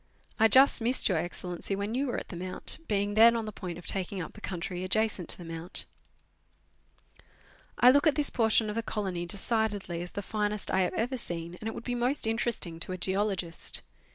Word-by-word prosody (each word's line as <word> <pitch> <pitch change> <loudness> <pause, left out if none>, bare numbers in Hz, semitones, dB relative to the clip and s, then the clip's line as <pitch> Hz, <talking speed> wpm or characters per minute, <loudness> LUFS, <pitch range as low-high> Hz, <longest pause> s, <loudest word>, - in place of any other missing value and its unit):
I 225 - +7
just 260 +3 +6
missed 245 +3 +2
Your 180 -5 +1
Excellency 175 +3 -4
when 200 +3 -3
you 270 +3 0
were 245 - -2
at - - -6
the 185 - -7
Mount, 185 +1 -1
being 205 -1 0
then 230 +2 +7
on 225 -1 -2
the 215 - -5
point 180 -4 -6
of 175 - -11
taking 195 0 -2
up 165 - -6
the 215 - -13
country 180 -1 -4
adjacent 200 -1 0
to - - +4
the 175 - -10
Mount. 165 +2 -5 1.9
I 250 - +7
look 285 +3 +4
at 305 - +4
this 295 -2 +3
portion 225 -2 +3
of 210 - -4
the 230 - 0
colony 190 -6 -3
decidedly 205 -3 -1
as 175 - -7
the 200 - -4
finest 210 0 -2
I - - +2
have 180 - 0
ever 250 +4 -1
seen, 170 -5 -4
and 220 - -4
it 225 - -4
would - - -7
be 245 - -3
most 245 +3 +1
interesting 225 -7 -1
to 185 - -5
a - - -4
geologist. 190 -2 0
205 Hz, 210 wpm, -29 LUFS, 180-225 Hz, 1.9 s, I